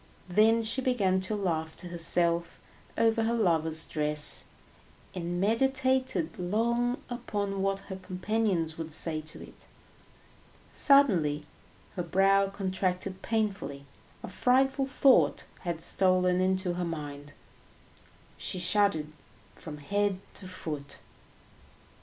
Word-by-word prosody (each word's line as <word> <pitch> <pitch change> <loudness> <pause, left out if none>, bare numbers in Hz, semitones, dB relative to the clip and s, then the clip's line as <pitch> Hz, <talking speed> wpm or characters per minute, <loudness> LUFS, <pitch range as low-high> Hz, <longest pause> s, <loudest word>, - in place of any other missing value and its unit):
Then 220 +5 +4
she 230 +4 0
began 205 -8 +1
to 190 +3 -1
laugh 160 -5 -2
to 180 - -7
herself 170 0 +1 0.4
over 225 0 +2
her 225 +1 0
lover's 160 -6 +1
dress, 150 -1 +2 0.7
and 175 -1 -4
meditated 260 -4 +1
long 235 +7 0
upon 200 -5 -3
what 195 0 -1
her 190 -1 -8
companions 185 -3 -2
would 160 -1 -5
say 155 0 +1
to 155 0 -10
it. - - -16 1.1
Suddenly 180 - +4 0.5
her 180 - -2
brow 195 +3 +3
contracted 190 -1 -3
painfully, 205 -11 -2 0.4
a - - -5
frightful 265 +2 +1
thought 265 0 +3
had 170 -3 -4
stolen 185 0 +2
into 185 -1 0
her 175 0 -3
mind, 145 -3 -6 1.1
she - - -4
shuddered 175 -4 +1 0.4
from 150 -2 -9
head 200 +5 -1
to 185 - -7
foot. 150 -6 -6
185 Hz, 110 wpm, -29 LUFS, 165-220 Hz, 1.1 s, Then